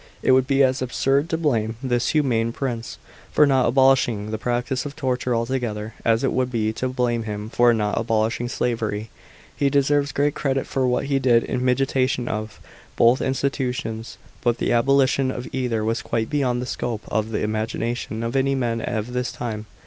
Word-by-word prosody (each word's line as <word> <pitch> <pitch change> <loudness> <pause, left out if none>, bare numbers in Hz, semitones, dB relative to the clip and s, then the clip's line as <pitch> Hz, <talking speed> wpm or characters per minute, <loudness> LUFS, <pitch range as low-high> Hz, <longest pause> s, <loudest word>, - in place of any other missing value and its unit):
It - - +4
would 130 0 +4
be 135 0 +4
as 130 0 +2
absurd 135 +4 +1
to 160 - 0
blame 115 -9 0
this 120 -2 0
humane 120 -7 +1
prince 120 -4 -4 0.3
for 150 - +5
not 135 -3 +3
abolishing 125 -5 +3
the 110 - -3
practice 125 +2 -1
of 145 0 -7
torture 125 -2 -1
altogether, 115 -3 -2
as 115 +1 +2
it 135 - +1
would 130 -1 0
be 110 -2 0
to 130 +3 -2
blame 125 -2 0
him 105 0 -5
for 120 0 +4
not 105 -3 0
abolishing 115 +1 0
slavery. 110 -3 -2 0.4
He 140 - +2
deserves 145 +1 +2
great 145 +1 +1
credit 135 -2 -1
for 130 -1 0
what 125 - 0
he 140 -1 +1
did 120 -3 +4
in 125 - -2
mitigation 130 -1 +1
of. 110 0 -4 0.4
both 120 +3 +4
institutions, 130 -4 -2 0.3
but 120 -1 +2
the - - -1
abolition 135 +2 +3
of 125 -1 -5
either 120 -4 -1
was 115 +1 0
quite 110 -1 -2
beyond 125 -4 0
the - - -4
scope 115 -3 -3
of 110 +1 -1
the 105 -1 -1
imagina 110 +2 -2
tion 115 -2 -5
of 115 +3 -3
any 135 +1 +2
man 115 -3 -1
of 110 -1 -2
his 125 +1 -3
time. 110 -3 -5
125 Hz, 185 wpm, -23 LUFS, 115-135 Hz, 0.4 s, for